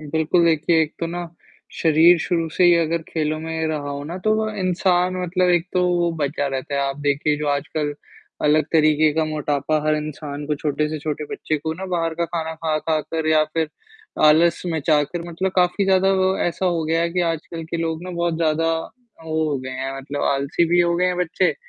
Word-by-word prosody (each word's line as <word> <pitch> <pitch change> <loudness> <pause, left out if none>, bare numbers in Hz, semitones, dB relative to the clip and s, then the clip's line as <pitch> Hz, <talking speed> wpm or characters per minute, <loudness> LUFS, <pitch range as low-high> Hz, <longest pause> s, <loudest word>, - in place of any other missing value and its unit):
बिल्कुल, 160 +3 +1
देखिए 160 0 +3
एक 155 - -3
तो 165 - 0
ना, 175 +1 -5 0.5
शरीर 165 +2 +5
शुरू 165 0 -1
से 180 - +4
ही 175 0 +7
अगर 165 0 0
खेलों 155 -1 -1
में 160 0 -3
रहा 150 -2 -3
हो 140 0 -5
ना 165 +4 -6
तो 215 0 +3
वो 220 0 0
इंसान 185 0 +1
मतलब 180 +1 +1
एक 175 0 +2
तो 180 - +2
वो 175 -1 +1
बचा 145 0 -1
रहता 135 +1 -4
है 140 - +1
आप 135 0 -1
देखिए 145 +1 +1
जो 150 - -3
आजकल, 145 +1 -1 0.5
अलग 155 +1 +4
तरीके 155 -1 +4
का 160 0 +1
मोटापा 150 -1 -1
हर 155 - +3
इंसान 150 -1 -6
को, 150 - 0
छोटे 150 +1 -1
से 155 0 -4
छोटे 150 0 -4
बच्चे 155 - -2
को 160 +2 -3
ना 190 - -6
बाहर 165 -3 -1
का 170 - -1
खाना 160 -1 -4
खा 160 -1 -1
खा 155 0 0
कर 160 +1 -4
या 155 -1 +4
फिर 160 -1 0 0.6
आलस 160 +3 +4
मचाकर 160 0 0
मतलब 185 +3 -2
काफ़ी 180 +2 +2
ज़्यादा 190 0 +3
वो 190 0 +2
ऐसा 175 +2 -1
हो 170 -2 0
गया 165 +1 +1
है 170 - 0
कि 180 - 0
आजकल 165 +1 -7
के 165 +1 -4
लोग 165 0 -2
ना 185 - -6
बहुत 170 -1 -1
ज़्यादा, 165 0 +1 0.5
वो 160 0 -1
हो 140 - -1
गए 130 0 -7
हैं 135 +1 -4
मतलब 140 +1 -5
आलसी 140 +4 +1
भी 175 +1 +4
हो 170 0 +2
गए 180 +1 +2
हैं 180 0 0
बच्चे 180 -1 +1
160 Hz, 215 wpm, -21 LUFS, 150-175 Hz, 0.6 s, ही